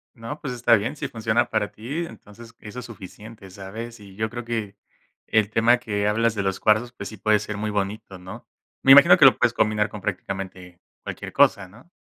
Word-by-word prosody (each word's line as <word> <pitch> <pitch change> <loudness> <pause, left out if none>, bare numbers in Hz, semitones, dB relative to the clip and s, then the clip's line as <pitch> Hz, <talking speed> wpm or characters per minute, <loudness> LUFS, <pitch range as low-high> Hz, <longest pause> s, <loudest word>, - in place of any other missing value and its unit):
No, 115 +6 -8
pues 135 -4 -4
está 120 -1 +4
bien. 105 +6 -2
Si 145 - -4
funciona 115 -1 -1
para 105 -2 -1
ti, 140 +10 -5
entonces 115 -6 -14
eso 105 +3 -9
es 125 - -8
suficiente, 105 -1 -12
¿sabes? 110 +5 -9
Y 100 -2 -14
yo 110 +2 -2
creo 120 +1 -7
que 110 -4 -4 0.5
el 110 -2 +2
tema 115 +2 +3
que 105 -4 -2
hablas 115 +2 +1
de 100 - -1
los 95 -1 -2
cuarzos, 110 +3 +2
pues 100 -5 -8
sí 110 - -11
puede 105 +2 +2
ser 105 0 -6
muy 105 +1 -3
bonito, 100 0 -4
¿no? 90 +1 -11 0.3
Me 135 - +5
imagino 140 +6 +9
que 155 - +6
lo 135 - +7
puedes 115 - +2
combinar 105 -2 +1
con 105 -1 -9
prácticamente 95 -2 -6 0.2
cualquier - - -7
cosa, 100 -2 +3
¿no? 115 - -19
110 Hz, 210 wpm, -23 LUFS, 100-120 Hz, 0.5 s, imagino